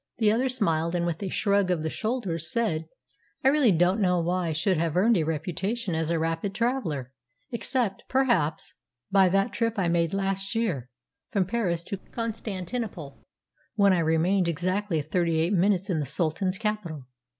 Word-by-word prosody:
The 215 -2 +4
other 250 +4 +1
smiled, 170 -8 0
and, 170 -1 0
with 170 +1 -2
a 195 - -2
shrug 200 0 +1
of 175 -4 0
the 160 - -1
shoulders, 195 -9 -2
said, 165 -9 0 0.6
"I 265 - +6
really 280 -6 +4
don't 180 +4 +3
know 180 -2 +3
why 175 +1 0
I - - -1
should 165 +4 +1
have 165 0 0
earned 225 +5 +4
a 175 - +2
reputation 180 +7 -2
as 160 0 -1
a 170 - +1
rapid 165 +4 -2
traveller, 170 - -1 0.4
except, 235 -4 -1
perhaps, 235 - +1 0.4
by 195 -2 +5
that 195 +2 +1
trip 230 -1 -1
I 180 -4 +1
made 170 -1 +1
last 195 +2 -1
year, 170 - -1 0.4
from 195 -3 +1
Paris 180 -5 -1
to 200 - -5
Constantinople, 205 - -5 0.5
when 200 -2 +5
I 180 - +2
remained 170 +3 +2
exactly 180 +2 0
thirty 165 +1 0
eight 170 +5 +1
minutes 190 0 +2
in 175 -6 0
the 145 - -2
Sultan's 185 +3 0
capital. 205 - -3
185 Hz, 170 wpm, -27 LUFS, 165-210 Hz, 0.6 s, I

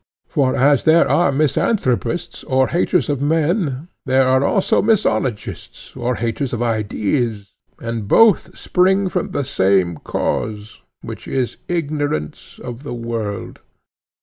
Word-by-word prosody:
For 130 -3 0
as 140 +1 +3
there 160 +1 +5
are 175 -5 +3
misanthropists 150 - 0
or 130 0 +2
haters 180 +1 +1
of 145 -3 -1
men, 155 -1 0 0.2
there 130 0 +3
are 130 +1 +3
also 195 +6 +2
misologists 195 - -1
or 125 +1 -1
haters 120 +4 -2
of 120 - -2
ideas, 110 -1 -1 0.3
and 115 -3 -4
both 225 - +4
spring 190 +1 +2
from - - -2
the 145 - -2
same 95 - +1
cause, 105 +5 -3 0.2
which - - -8
is 130 -3 -2
ignorance 145 - -3
of 120 +1 -7
the 140 -4 -6
world. 115 -3 -5
130 Hz, 125 wpm, -19 LUFS, 115-155 Hz, 0.3 s, there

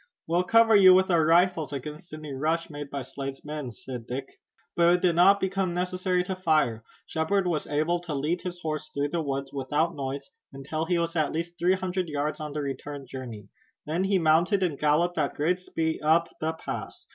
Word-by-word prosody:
"We'll 175 +2 +1
cover 225 +3 +5
you 185 -2 +8
with 190 0 +3
our 165 -2 +4
rifles 165 -1 +3
against 150 +5 -7
any 155 -2 -7
rush 160 +5 -1
made 145 -1 -7
by 140 -1 -4
Slade's 135 +2 -7
men," 150 -4 -5
said 120 0 -8
Dick. 135 +2 -6 0.4
But 170 0 +5
it 180 - -2
did 175 -2 +3
not 195 +4 +6
become 190 -2 -1
necessary 180 0 0
to 190 +1 -3
fire. 155 -11 +1 0.2
Shepard 185 +5 0
was 165 -4 -1
able 155 +4 +1
to 170 -4 -5
lead 155 +6 -1
his 180 -1 -6
horse 155 -1 -3
through 140 +1 -1
the 170 +2 -1
woods 140 -2 -3
without 150 +5 0
noise, 140 - -5 0.2
until 150 +4 -4
he 175 +1 +1
was 170 0 -1
at 155 -3 +1
least 170 +2 -3
three 180 +2 +3
hundred 185 -2 -2
yards 150 0 -2
on 150 -2 -5
the 150 - -2
return 140 +1 -5
journey. 120 -6 -8 0.4
Then 165 +5 -1
he 195 0 +2
mounted 170 +4 +3
and 160 -6 -1
galloped 160 +3 +2
at 145 - 0
great 175 +5 +1
speed 160 -3 -2
up 165 +2 +3
the 160 +1 -1
pass. 160 - -7
160 Hz, 205 wpm, -27 LUFS, 145-180 Hz, 0.4 s, you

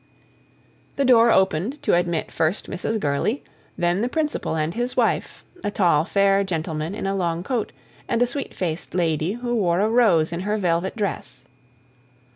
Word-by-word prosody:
The 280 - +1
door 235 -2 +6
opened 190 - +1
to - - +2
admit 175 -2 0
first 160 +5 -1
Mrs. 215 +4 -2
Gurley, 150 - -1 0.3
then 175 +3 +1
the 240 - 0
Principal 300 - -1
and 155 +1 -1
his 245 +2 -3
wife - - 0 0.2
a - - 0
tall, 170 -6 +2
fair 200 +1 +3
gentleman 160 -1 -3
in - - -4
a 195 0 0
long 170 -2 -1
coat, 235 +1 -2 0.4
and 230 - 0
a 245 - +4
sweet 275 +3 -5
faced 170 -1 -3
lady, 165 0 0
who 240 +1 -3
wore 180 -5 +1
a 210 - +3
rose 215 -10 +3
in 170 - -3
her 210 +3 -1
velvet 180 -1 0
dress. 210 -3 -4
190 Hz, 170 wpm, -23 LUFS, 170-225 Hz, 0.4 s, door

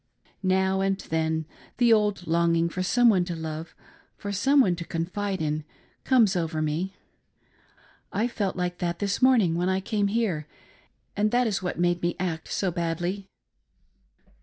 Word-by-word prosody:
Now 190 0 +2
and 195 0 +1
then 160 -2 -1 0.3
the 240 -2 +5
old 210 -4 +1
longing 170 0 +2
for 185 - -4
some 240 +6 +3
one 195 -6 +5
to 175 -1 -4
love, 160 0 -6 0.4
for 200 - -5
some 270 +9 +3
one 185 -10 +4
to 170 - -4
confide 185 +3 -3
in, 150 0 -1 0.4
comes 230 -7 +4
over 165 -2 -1
me. 155 +5 -2 1.2
I 220 +4 0
felt 205 -5 -2
like 180 -1 -3
that 170 -1 -1
this 200 +2 -2
morning 240 -10 +5
when 175 +2 0
I 190 0 +1
came 205 +1 0
here, 200 -8 -1 0.7
and 210 +1 +2
that 245 +2 +2
is 205 -4 -1
what 180 - -3
made 175 0 +1
me 175 0 0
act 165 -3 -3
so 190 -2 -1
badly." 175 +3 -2
185 Hz, 160 wpm, -26 LUFS, 170-205 Hz, 1.2 s, the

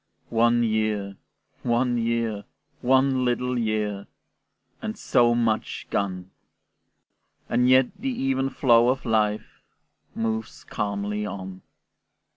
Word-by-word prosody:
One 120 +1 +3
year, 110 -3 -1 0.5
one 120 +1 +1
year, 115 -3 -1 0.4
one 130 0 +3
little 125 +1 0
year, 105 -3 -2 0.7
And - - -4
so 120 -1 +3
much 115 -2 -1
gone! 95 -2 -2 1.2
And 125 +1 +2
yet 130 +7 +4
the 270 - -2
even 135 - 0
flow 120 -3 +4
of 130 +1 -1
life 110 -2 0 0.5
Moves 110 0 -3
calmly 105 0 -3
on. 95 -1 -7
115 Hz, 100 wpm, -25 LUFS, 105-125 Hz, 1.2 s, yet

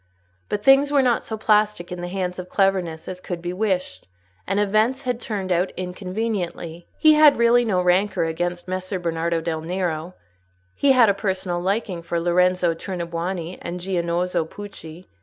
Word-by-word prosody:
But 210 0 -2
things 270 +3 +5
were 280 -2 +4
not 245 -2 +2
so 220 - -5
plastic 210 -4 +1
in 180 -1 -5
the 175 - -4
hands 180 -1 -3
of 180 0 -7
cleverness 185 -5 0
as 185 0 -6
could 175 -2 -5
be 175 +1 -4
wished, 185 - -2 0.4
and 195 +1 0
events 215 +6 +1
had 250 -2 -2
turned 195 -4 -4
out 180 +2 +1
inconveniently. 180 -2 -4
He 310 -1 +6
had 300 -1 +6
really 235 +1 +4
no 205 -6 +1
rancour 185 +3 +2
against 175 +2 -3
Messer 185 +1 -3
Bernardo 170 -1 -1
del 160 -1 -3
Nero: 175 0 -3 0.6
he 275 - +3
had 245 -3 +6
a - - +4
personal 190 -3 -2
liking 190 -1 -2
for 170 0 -2
Lorenzo 180 0 +2
Tornabuoni 170 0 -4
and 175 +1 -5
Giannozzo 175 -1 -1
Pucci. 175 -1 -10
185 Hz, 165 wpm, -23 LUFS, 175-210 Hz, 0.6 s, He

